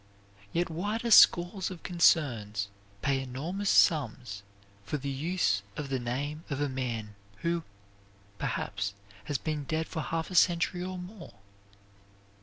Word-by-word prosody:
Yet 170 0 0
why 205 +7 -1
do 235 0 -3
scores 180 -1 +6
of 180 -3 -9
concerns 120 - +2 0.3
pay 135 -1 +2
enormous 160 +11 -3
sums 120 -8 +3 0.4
for 150 - -2
the 140 0 -4
use 140 - +1 0.2
of 145 -2 -4
the 135 -1 0
name 140 +6 -3
of 140 -1 -2
a 145 - +1
man 120 -5 -3 0.3
who, 170 0 +1 0.8
perhaps, 100 +3 -2 0.3
has 145 - -1
been 150 -1 -3
dead 160 +2 -1
for 160 - -4
half 165 +3 -3
a - - -5
century 175 0 +3
or 185 0 -4
more? 180 - -10
150 Hz, 140 wpm, -30 LUFS, 130-175 Hz, 0.8 s, scores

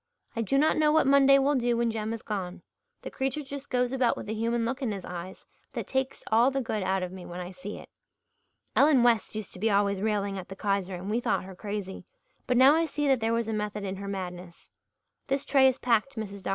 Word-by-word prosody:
I 230 - -1
do 230 +5 +1
not 310 +3 +3
know 305 -1 +4
what 315 -1 +4
Monday 275 0 +6
will 275 +1 +2
do 240 -3 +1
when 235 -1 +1
Jem 220 0 -3
is 230 -1 -5
gone. 185 -4 -5 0.4
The - - -6
creature 270 +3 -2
just 280 0 -8
goes 250 -1 +1
about 260 -2 +1
with - - -7
a - - -1
human 230 +1 0
look 265 +4 -3
in 250 -5 -1
his 195 -2 -5
eyes 180 +1 -8 0.3
that - - -4
takes 265 0 -2
all 230 +4 +5
the 275 0 -1
good 220 -4 -2
out 190 0 0
of 180 - -4
me 185 -1 -9
when 175 +1 -7
I 180 0 -6
see 190 +3 -7
it. - - -11 0.9
Ellen 280 -4 +5
West 230 -3 +2
used 215 -3 -5
to - - -9
be 220 +3 +1
always 200 -1 +2
railing 200 -2 -1
at 180 - -10
the 195 - -7
Kaiser 195 -2 -1
and 180 +2 -7
we 220 +3 0
thought 245 - 0
her 190 0 -9
crazy, 200 -1 -5 0.4
but 250 - +2
now 265 +3 +8
I 325 +1 +2
see 295 -1 -2
that 265 -2 +4
there 225 0 0
was 230 -1 0
a 225 - -2
method 210 -1 -3
in 190 -1 -4
her 200 +1 -6
madness. 180 -3 -7 0.6
This 275 0 -1
tray 270 -1 +5
is 260 0 +2
packed, 245 +3 +1
Mrs. 200 -3 -6
Dr. - - -4
220 Hz, 250 wpm, -28 LUFS, 195-265 Hz, 0.9 s, now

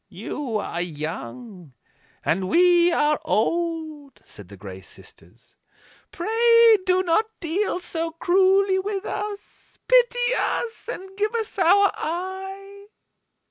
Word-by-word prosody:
"You 250 -7 -5
are 175 -4 -4
young, 175 - -7 0.5
and 185 +3 0
we 350 0 +4
are 300 -2 +1
old," 315 +1 -2
said 105 -3 -13
the 100 - -12
Gray 95 -1 -10
Sisters; 95 +5 -18 0.6
"pray, 460 +4 +4
do 370 0 +3
not 370 +5 +1
deal 355 +3 -1
so 330 -2 -4
cruelly 380 +3 +2
with 395 +1 -4
us. 415 -1 -7
Pity 485 0 +3
us, 460 0 -3
and 385 -3 -9
give 425 +2 -1
us 445 -3 -4
our 390 +3 +5
eye." 385 +4 -6
355 Hz, 115 wpm, -23 LUFS, 275-400 Hz, 0.6 s, our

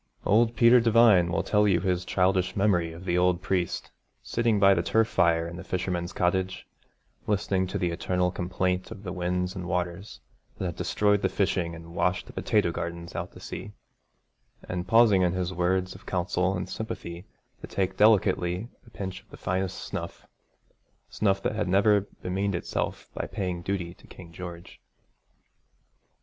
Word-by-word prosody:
Old 115 +3 +3
Peter 120 +2 +7
Devine 115 -7 +5
will 90 - 0
tell 105 0 +3
you 95 -4 +3
his 90 -1 0
childish 95 0 +1
memory 90 -5 +2
of 85 +3 -10
the 90 -1 +1
old 90 -1 +3
priest 90 -2 -1 0.3
sitting 115 -3 +1
by 100 0 +7
the 85 - +1
turf 110 +6 +2
fire 85 -4 +2
in 85 +1 -7
the 95 - -7
fisherman's 90 -2 -2
cottage, 95 +2 -1 0.6
listening 95 -2 +1
to - - -3
the 90 -1 0
eternal 90 +1 0
complaint 90 +1 -1
of 110 -3 -9
the 90 -3 -5
winds 90 +1 -1
and 90 -2 -5
waters 90 +3 -3 0.4
that - - -3
had 85 -2 -3
destroyed 105 -1 +1
the 95 - +1
fishing 90 -3 0
and 85 0 -11
washed - - 0
the - - -13
potato 105 -5 +1
gardens 85 0 -5
out - - -4
to - - -12
sea, 105 - -7 0.9
and 90 0 -4
pausing 115 -2 +5
in 90 -1 +2
his 90 0 -2
words 90 +1 0
of - - -15
counsel 90 +1 0
and 90 - -4
sympathy 95 -5 -6 0.3
to - - -7
take 95 -1 -1
delicately 100 -1 +3 0.2
a - - -13
pinch 95 -4 -6
of - - -33
the - - -12
finest 95 0 -2
snuff, - - -6 0.9
snuff 95 -2 +1
that - - 0
had 105 -2 -1
never 100 +1 +4 0.2
bemeaned 95 +1 -1
itself 85 - -3
by - - -4
paying 90 -3 -3
duty 90 -2 -3
to - - -20
King 85 -2 -12
George. 85 -1 -9
95 Hz, 170 wpm, -27 LUFS, 90-100 Hz, 0.9 s, Peter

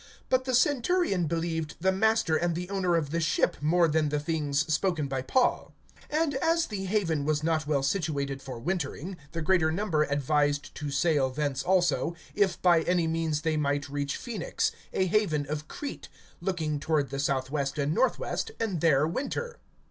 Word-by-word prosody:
(11)But 255 0 +3
the 255 -1 +1
centurion 255 - +2
believed 165 -1 -2
the 190 +2 +2
master 205 -4 +2
and 170 +1 +1
the 180 +3 -5
owner 185 -3 +1
of 150 -4 -1
the 170 - 0
ship, 165 -1 +1
more 170 +3 +4
than 155 -1 +1
the 150 0 0
things 145 -2 0
spoken 160 -3 0
by 135 -1 -2
Paul. 250 - +1 0.4
(12)And 305 -1 +1
as 330 +3 +2
the 195 -2 -4
haven 180 -7 0
was 150 +1 0
not 155 -2 0
well 140 -3 +1
situated 140 -3 -1
for 130 -3 -7
wintering, 175 +3 -3 0.2
the 165 -1 -3
greater 160 -2 +3
number 170 -3 0
advised 145 0 0
to 145 - -5
sail 140 -1 +2
thence 140 0 -2
also, 175 -2 +1 0.2
if 195 -4 +1
by 175 -2 +5
any 175 -1 +1
means 160 -2 -1
they 160 -1 0
might 145 -1 0
reach 140 0 -2
Phoenix, 220 -8 -2 0.2
a 190 - +1
haven 170 -7 +1
of 150 +1 -4
Crete, 290 - -7 0.3
looking 160 -6 -2
toward 145 -2 0
the 140 - -3
southwest 135 +1 -1
and 145 +1 0
northwest, 260 - 0
and 200 -8 -1
there 150 -3 +4
winter. 470 - -3
160 Hz, 175 wpm, -28 LUFS, 145-190 Hz, 0.4 s, by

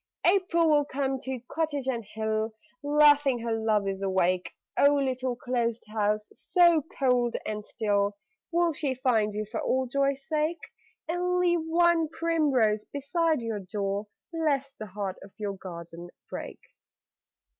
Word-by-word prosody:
April 350 -3 +3
will 295 -2 +4
come 270 -1 -2
to 260 0 -4
cottage 295 -4 -2
and 240 -3 -1
hill, 220 +1 -2 0.3
Laughing 290 -2 +5
her 230 0 -2
lovers 210 -3 0
awake. 185 -2 0 0.2
(Oh, 285 +1 +5
little 260 -2 -1
closed 240 -3 -2
house, 210 0 0
so 345 -3 +4 0.2
cold 250 -3 +2
and 210 0 -3
still, 205 -1 0 0.3
Will 340 -1 +2
she 280 -3 -1
find 230 -5 +2
you 215 0 -2
for 215 +1 -4
old 260 -1 0
joy's 275 0 0
sake, 310 +2 0 0.5
And 360 +2 0
leave 345 -2 +2
one 335 0 +3
primrose 285 -11 +1
beside 310 0 0
your 225 -2 -2
door, 200 +1 -3 0.3
Lest 280 -4 0
the 215 - -6
heart 195 -1 -4
of 195 - -14
your 205 -2 -3
garden 170 -2 -9 0.2
break?) - - -7
255 Hz, 140 wpm, -28 LUFS, 210-300 Hz, 0.5 s, Laughing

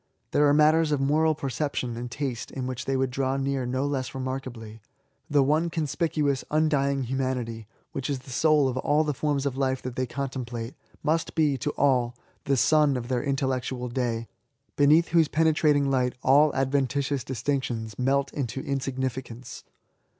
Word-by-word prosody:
There 150 - +4
are - - +5
matters 155 +1 +4
of 145 - +1
moral 155 +3 +2
perception 135 -3 -3
and 120 +1 -5
taste 130 -2 -4
in 130 -2 -5
which 130 -1 -4
they 135 0 0
would 130 -1 0
draw 135 +1 0
near 135 -2 -1
no 130 +2 -1
less 135 -2 -3
remarkably. 130 -4 -5 0.5
The 145 -1 +4
one 155 +5 +2
conspicuous, 155 -3 -1
undying 145 -3 +1
LIFE 125 - -5
TO 135 - -1
THE - - 0
INVALID. 130 0 0
99 115 -2 -4
humanity^ 110 -1 -11 0.3
which 135 +1 -4
is 140 - 0
the 130 - -12
soul 150 0 +3
of 130 -1 -2
all 150 +4 +2
ihe 150 - -1
fonns 145 -1 -1
of 135 -2 -2
life 130 -1 0
that 125 -1 -5
they 130 0 -1
contemplate, 125 -3 -4 0.3
must 160 +2 0
be^ 150 -4 +2
to 150 - -1
all^ 125 -3 +2 0.3
the 140 -1 +2
sun 150 0 +4
of 120 0 -6
their 125 -2 0
intellectual 130 -3 -2
day^ 120 -2 -1 0.5
beneath 150 +4 +4
whose 165 -1 +4
penetra 155 0 +3
ting 140 -1 +2
light 125 -2 +1
all 145 +3 +5
adventitious 135 0 0
distinctions 120 -4 -3
melt 140 +2 +1
into 135 -2 -3
insignificance. 130 -2 -4
135 Hz, 180 wpm, -26 LUFS, 125-145 Hz, 0.5 s, are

